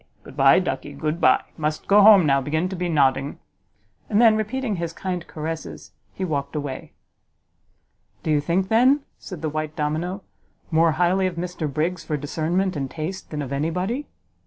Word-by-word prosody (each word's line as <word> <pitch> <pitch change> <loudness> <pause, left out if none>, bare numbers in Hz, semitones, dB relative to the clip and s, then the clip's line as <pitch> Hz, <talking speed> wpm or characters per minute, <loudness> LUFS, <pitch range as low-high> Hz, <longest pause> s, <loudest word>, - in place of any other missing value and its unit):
Good - - -13
by, - - +6
ducky, - - -2
good 155 +2 -3
by! - - +4
must 155 -1 -2
go 205 +1 +6
home 200 -4 +8
now, 140 -1 +3
begin 155 +6 -1
to 190 - -5
be 175 0 -2
nodding." 140 -2 +1 0.7
And 210 - +2
then, 225 -2 +6
repeating 215 0 -2
his 170 -1 -4
kind 180 -2 -4
caresses, 160 +1 -6 0.2
he 190 - -4
walked 140 -3 -3
away. 145 -3 -5 1.3
"Do 160 - -1
you 150 -1 +3
think, 180 +5 0
then," 255 +6 +4 0.2
said 175 -5 -9
the 155 - 0
white 155 0 -4
domino, 165 +6 -2 0.5
"more 160 0 +4
highly 180 +3 +2
of 180 - -4
Mr 170 -3 -4
Briggs 165 +5 -1
for 150 - -2
discernment 170 +6 -1
and 135 -2 -3
taste 165 +6 -6
than 150 -2 -4
of 135 0 -5
any 145 +4 0
body?" 195 - -3
165 Hz, 180 wpm, -23 LUFS, 150-190 Hz, 1.3 s, home